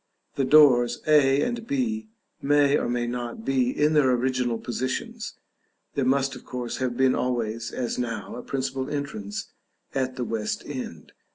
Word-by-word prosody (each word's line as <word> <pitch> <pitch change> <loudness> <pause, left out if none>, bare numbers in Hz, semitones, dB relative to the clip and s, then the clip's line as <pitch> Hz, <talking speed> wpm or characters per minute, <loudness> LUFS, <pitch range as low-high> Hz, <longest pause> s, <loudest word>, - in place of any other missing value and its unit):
The 135 - 0
doors 130 -5 +6
A 145 -2 +5
and 235 -1 -3
B 225 -5 -1 0.3
may 145 0 +4
or - - 0
may 120 0 0
not 120 -2 -5
be 130 -2 +2
in 150 +4 +2
their 145 -4 +4
original 125 -1 +1
positions; 130 +3 -4 0.6
there 140 - 0
must 135 +1 +2
of - - -11
course 125 -2 -4
have 125 -2 -2
been 130 -1 +4
always, 115 -2 -1
as 125 -1 -3
now, 115 -3 -3
a 125 - -6
principal 135 0 -3
entrance 140 -9 -4 0.4
at 130 -1 -1
the 125 -2 -2
west 110 -2 -2
end. 125 - -7
130 Hz, 160 wpm, -26 LUFS, 120-140 Hz, 0.6 s, doors